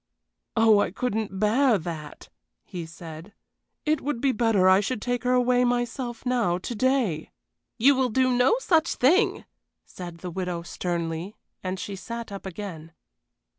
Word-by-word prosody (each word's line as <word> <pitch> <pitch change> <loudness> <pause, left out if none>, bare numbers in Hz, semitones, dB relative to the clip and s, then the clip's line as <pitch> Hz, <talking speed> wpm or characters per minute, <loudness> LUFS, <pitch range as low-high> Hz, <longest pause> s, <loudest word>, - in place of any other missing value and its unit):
"Oh, 225 -2 +5
I - - +2
couldn't 215 -2 -2
bear 225 +3 +4
that!" 160 -4 -7 0.3
he 175 -3 -7
said. 165 +3 -10 0.5
"It 305 -1 +1
would 290 -3 -2
be 270 +2 +2
better 220 -5 +3
I 190 +1 +7
should 215 +3 -2
take 245 +1 -2
her 250 - +3
away 250 0 +3
myself 240 0 -2
now, 235 -9 +1
to 185 - -5
day." 235 - 0 0.5
"You 265 +5 +6
will 260 -1 +1
do 255 +3 +2
no 250 - +4
such 335 -9 +2
thing!" 375 - +3 0.4
said 175 -2 -9
the 180 +1 -7
widow, 180 -1 -3
sternly, 170 +2 -3 0.3
and 185 0 -3
she 200 +2 -5
sat 230 +3 -7
up 195 -1 -7
again. 170 -4 -7
215 Hz, 155 wpm, -26 LUFS, 180-250 Hz, 0.5 s, I